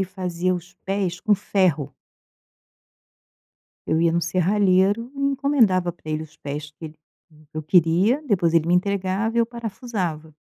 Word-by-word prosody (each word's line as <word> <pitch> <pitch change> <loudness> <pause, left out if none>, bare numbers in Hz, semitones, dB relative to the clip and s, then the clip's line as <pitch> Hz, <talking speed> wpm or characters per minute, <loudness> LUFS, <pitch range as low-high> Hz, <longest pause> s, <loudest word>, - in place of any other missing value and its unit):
e - - +2
fazia 185 -1 -2
os 175 +2 -8
pés 190 -3 -2
com 215 - +3
ferro. 180 -8 0 1.9
Eu 160 - +1
ia 170 -1 +3
no 170 - +1
serralheiro 190 +5 +2
e - - -5
encomendava 270 -10 +2
pra 160 -2 -10
eles 155 0 -4
os - - -24
pés 150 +1 -6
que 160 - -9
ele 155 - -11 0.5
que 155 - -14
eu 155 - -3
queria 180 - +3
depois 175 -8 +2
ele 165 -1 +3
me 175 - +3
entregava 200 +4 0
e - - +3
eu 230 - +2
parafusava. 200 -9 -5
185 Hz, 160 wpm, -23 LUFS, 165-205 Hz, 1.9 s, com